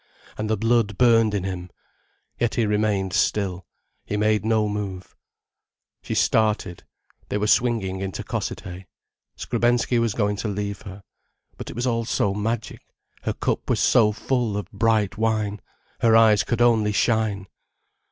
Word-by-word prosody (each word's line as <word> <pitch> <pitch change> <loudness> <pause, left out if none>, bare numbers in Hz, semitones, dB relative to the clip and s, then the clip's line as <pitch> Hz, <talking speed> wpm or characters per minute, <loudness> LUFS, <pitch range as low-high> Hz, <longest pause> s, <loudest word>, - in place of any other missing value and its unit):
And 110 0 -4
the 110 - +1
blood 115 -2 +1
burned 115 -3 +4
in 100 - -1
him. 90 -1 -5 0.7
Yet 120 -1 0
he 115 - +2
remained 105 -3 0
still, 95 -3 0 0.4
he 105 - -3
made 105 0 +2
no 110 -1 +2
move. 100 -3 -5 0.9
She - - -4
started. 105 -5 +1 0.5
They - - -1
were 105 - 0
swinging 105 -4 +1
into 95 -1 -4
Cossethay. 90 +1 -5 0.5
Skrebensky 120 0 +1
was 115 -2 0
going 105 -2 0
to 110 - -3
leave 100 0 -4
her. 100 +1 -11 0.5
But - - -8
it - - -8
was 120 +2 -2
all 115 -2 0
so 100 -2 0
magic, 110 +2 -3 0.4
her - - 0
cup - - -2
was - - +1
so 110 -3 +4
full 115 -1 -1
of 100 -2 -6
bright 110 -1 +1
wine, 110 -2 0 0.4
her 115 -1 +4
eyes 110 -2 +5
could 120 -1 -2
only 110 -3 +3
shine. 105 -2 +1
105 Hz, 150 wpm, -23 LUFS, 100-115 Hz, 0.9 s, eyes